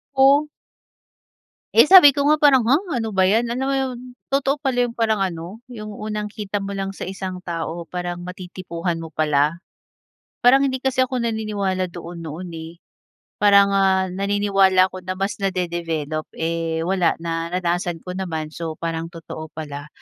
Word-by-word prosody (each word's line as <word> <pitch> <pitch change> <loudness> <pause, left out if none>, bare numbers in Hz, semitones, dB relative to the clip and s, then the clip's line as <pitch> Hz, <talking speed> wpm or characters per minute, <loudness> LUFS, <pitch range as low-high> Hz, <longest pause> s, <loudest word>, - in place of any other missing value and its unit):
Oh. 280 +3 +5 1.3
Eh, - - +8
sabi 360 -4 +10
ko 280 - +2
nga, 305 +1 +3
parang 265 -5 +5
ha, 280 +9 +4 0.2
ano 225 -3 -3
ba 190 0 +3
'yan? 230 +3 +3
Alam 245 +3 -2
mo 275 - +1
'yon, 260 -2 -2 0.4
totoo 275 +1 +2
pala 265 -3 0
'yong 240 -1 -2
parang 220 -3 +1
ano, 180 +4 -4
'yong 215 -3 -8
unang 210 -1 -3
kita 205 -1 -4
mo 200 0 -4
lang 195 0 -3
sa - - -5
isang 190 -1 -5
tao, 170 0 -4
parang 175 0 -5
matitipuhan 180 -2 -5
mo 165 -2 -8
pala. 155 +2 +1 0.8
Parang 270 +3 +5
hindi 260 -1 -1
kasi 260 -1 +2
ako 255 -1 -3
naniniwala 200 -5 -2
doon 170 -1 -8
noon, 165 +4 -6
eh. 160 0 -8 0.7
Parang 200 -1 +6
ah, 190 -1 +2
naniniwala 195 -1 +3
ako 185 - -7
na 185 - -2
mas 195 +1 -3
nade-develop, 170 -5 -2
eh, 165 0 -2
wala, 185 -1 +1
naranasan 170 +1 -2
ko 180 - -5
naman, 160 -5 -4
so 160 -1 -5
parang 165 0 -3
totoo 165 -2 -9
pala. 145 -1 -6
190 Hz, 160 wpm, -22 LUFS, 170-220 Hz, 1.3 s, sabi